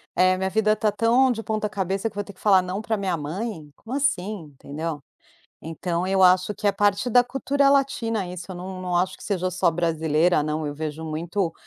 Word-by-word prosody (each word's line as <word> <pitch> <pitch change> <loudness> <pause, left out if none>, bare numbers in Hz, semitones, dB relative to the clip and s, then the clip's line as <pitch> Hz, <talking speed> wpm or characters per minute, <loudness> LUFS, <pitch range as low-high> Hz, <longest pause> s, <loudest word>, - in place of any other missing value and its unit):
eh: 185 0 +4
"A - - -6
minha 190 0 -1
vida 215 +1 +3
está 215 0 +1
tão 235 +5 +3
de 225 -2 -3
ponta-cabeça 210 -1 -2
que - - -22
eu - - -4
vou 205 - -1
ter 200 - -11
que 185 - -25
falar 195 -3 +5
"não" 185 +2 -4
pra 220 0 -1
minha 190 -4 -1
mãe? 160 +1 -5
Como 230 - -7
assim?", 205 - -1
entendeu? 150 +2 -5 0.6
Então 170 +2 -3
eu 190 0 +1
acho 185 +2 +5
que 210 - -4
é 200 - +4
parte 205 +3 +1
da 245 +1 +6
cultura 275 +2 +1
latina 230 -7 +1
isso. 180 0 -7
Eu 185 - -6
não 185 +1 -7
não 180 -1 -1
acho 180 +2 0
que - - -15
seja 185 -3 -1
só 180 -1 +2
brasileira, 160 -1 +1
não. 155 +1 -2
Eu 145 - -4
vejo 155 +1 -5
muito 165 +3 -2
185 Hz, 220 wpm, -24 LUFS, 165-215 Hz, 0.6 s, da